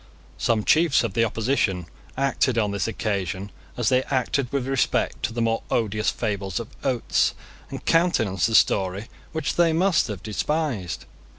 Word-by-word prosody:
Some 110 -3 +1
chiefs 155 0 +4
of 115 -4 -2
the 115 - +2
opposition 110 -5 0 0.3
acted 135 -2 +1
on 105 -3 +1
this 100 +2 -1
occasion 100 -3 -3 0.3
as 120 -3 +2
they 130 0 +4
acted 130 -1 0
with 140 -3 -1
respect 135 -1 0
to 105 - -1
the 115 0 -1
more 115 0 +1
odious 110 -1 0
fables 100 -2 -2
of 115 - -7
Oates, 130 -3 +1 0.3
and - - -7
countenanced 115 - +2
a 115 - +1
story 95 +3 +2 0.2
which 160 -3 -2
they 170 -2 +4
must 175 0 +3
have 100 -7 -6
despised. 110 - -2
115 Hz, 160 wpm, -24 LUFS, 100-135 Hz, 0.3 s, chiefs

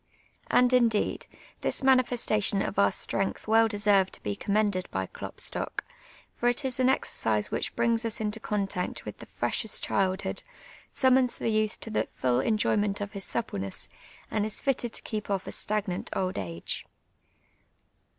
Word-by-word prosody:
And, 250 0 +4
indeed, 230 -4 +2 0.3
this - - 0
manifestation 240 -6 +3
of 195 - -2
our 200 - +5
strength 195 +2 -2
well 225 +1 +5
deser\ 205 -2 +4
cd - - -19
to - - -6
be 100 -1 -2
commended 200 - 0
by 95 0 -2
Klopstock, - - -3 0.5
for 240 - +2
it 245 +4 -1
is 260 -1 -1
an 255 0 +4
exercise 110 - +1
which - - -2
brings 235 0 +2
us 230 -2 -2
into 215 0 -2
contact 195 -4 -2
with - - -7
the - - -10
freshest 220 - -1
childlu)od, 190 -1 0 0.5
summons 260 -2 +3
the - - -1
youth 215 -1 +1
to 225 - -4
the - - +1
fidl 125 0 0
enjo\qneut 210 -2 +2
of 205 0 -4
his 200 -2 -3
suppleness, 100 - -3 0.4
and 215 - +1
is 215 0 -3
fitted 250 -4 0
to - - -5
keep 215 -2 -4
off 195 -2 -1
a - - -5
stagnant 205 -4 -1
old 185 -1 -1
age. 85 -3 -4
210 Hz, 160 wpm, -28 LUFS, 195-230 Hz, 0.5 s, our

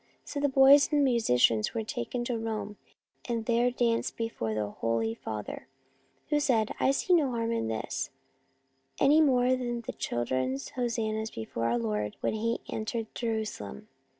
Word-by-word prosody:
So 290 - -4
the 285 0 +2
boys 270 +1 +7
and 295 -1 +3
the 270 -2 +4
musicians 125 - +2
were 225 - -1
taken 220 - -3
to 240 - -1
Rome, 215 -2 -4 0.5
and 230 -2 -1
there 235 +1 +3
danced 235 -2 0
before 170 - -2
the 105 -1 -2
Holy 115 0 -1
Father, 110 -2 -6 0.6
who 295 -1 +3
said, 230 -7 +2
c - - -6
I - - +3
see 275 +6 +2
no 310 -6 +4
harm 230 -1 -1
in 230 - -1
this, 115 +4 -3 0.9
any 295 +3 +6
more 250 -4 +4
than 255 0 +1
in 240 0 -2
the 230 - -6
children's 130 +3 -2
hosannas 225 -3 -2
before 115 - -4
Our 115 +1 +2
Lord 105 -2 -2
when - - 0
He 230 +2 -1
entered 220 0 -4
Jerusalem. 220 - -4
225 Hz, 170 wpm, -29 LUFS, -, 0.9 s, boys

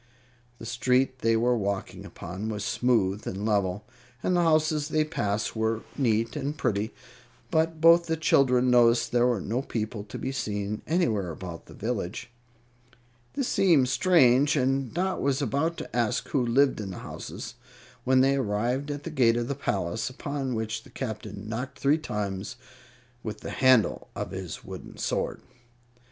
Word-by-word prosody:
The 115 - -9
street 130 +3 +1
they 115 -1 +2
were 120 +2 +2
walking 100 -3 -3
upon 95 +5 -6
was 105 -1 -3
smooth 110 -6 +1
and 100 +2 -3
level, 100 -2 0 0.4
and 185 - +2
the 175 - +3
houses 155 -2 +2
they 155 0 +2
passed 105 -9 -2
were 110 0 0
neat 115 -4 +1
and 145 +1 -3
pretty; 110 -4 -1 0.6
but 160 -1 +1
both 170 +1 +6
the 160 0 0
children 130 -5 +3
noticed 120 -1 +4
there 120 0 +4
were 120 -4 +1
no 115 +7 -2
people 110 -5 -4
to 105 - -8
be 130 - -3
seen 105 -5 -3
anywhere 115 - +1
about 85 0 -8
the - - -12
village. 115 +1 -4 1.0
This 275 -3 -1
seemed 160 -10 +4
strange, 145 -3 +4
and 135 -2 +1
Dot 185 +2 -1
was 140 0 +1
about 145 +5 0
ask 120 -2 0
who 135 -4 +1
lived 130 +1 +3
in 100 - -5
the 90 - -7
houses, - - -7 0.5
when 130 0 +4
they 135 +1 +3
arrived 125 +4 -1
at 145 0 -4
the 165 - -5
gate 120 -5 +3
of 120 0 -1
the 140 - -1
palace, 110 -4 -2
upon 135 -1 -3
which 110 0 -3
the - - -17
Captain 105 -4 -6
knocked 125 +5 -4
three 145 +3 +2
times 100 -7 -4 0.7
with 110 -2 -6
the - - -6
handle 130 -4 +3
of - - -4
his - - -6
wooden - - -9
sword. - - -2
125 Hz, 165 wpm, -27 LUFS, 110-140 Hz, 1.0 s, both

